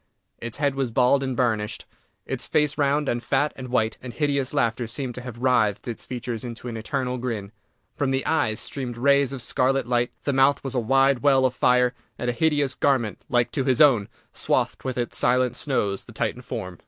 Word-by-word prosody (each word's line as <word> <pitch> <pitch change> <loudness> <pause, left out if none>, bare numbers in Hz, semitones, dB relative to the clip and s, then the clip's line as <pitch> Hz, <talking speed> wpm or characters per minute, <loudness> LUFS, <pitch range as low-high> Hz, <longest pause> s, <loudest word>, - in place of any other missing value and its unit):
Its 120 -1 -6
head 145 -1 +1
was 135 -2 -1
bald 125 +4 +3
and 130 -2 -3
burnished; 110 -4 -1 0.4
its - - -5
face 150 -1 +1
round, 145 0 +1
and 120 -1 0
fat, 145 +4 0
and 130 -1 -7
white; 115 -3 0
and 125 -2 -7
hideous 140 -3 0
laughter 120 -4 0
seemed 125 +2 -4
to 125 - -7
have 125 -2 -8
writhed 120 -5 +1
its 120 - -5
features 120 -2 -5
into 120 0 -7
an 120 - -5
eternal 125 +3 -2
grin. 110 -5 -4 0.4
From 140 - 0
the 135 0 0
eyes 110 -9 +1
streamed 125 -4 -5
rays 140 +1 +3
of 135 -4 -5
scarlet 135 +3 +1
light, 120 0 +1
the 140 - 0
mouth 135 +1 +3
was 135 -1 -3
a 125 - +1
wide 135 +3 +3
well 135 0 +4
of 130 - +1
fire, 125 0 +3 0.2
and 125 - -1
a - - -6
hideous 145 -1 +1
garment, 130 -8 0
like 120 -1 +2
to 135 - -1
his 130 0 +1
own, 130 -10 +5 0.2
swathed - - -1
with 130 -2 -3
its 120 -1 -1
silent 125 0 +2
snows 105 -9 -1
the - - -13
Titan - - -2
form. 90 -2 -6
125 Hz, 205 wpm, -24 LUFS, 120-135 Hz, 0.4 s, own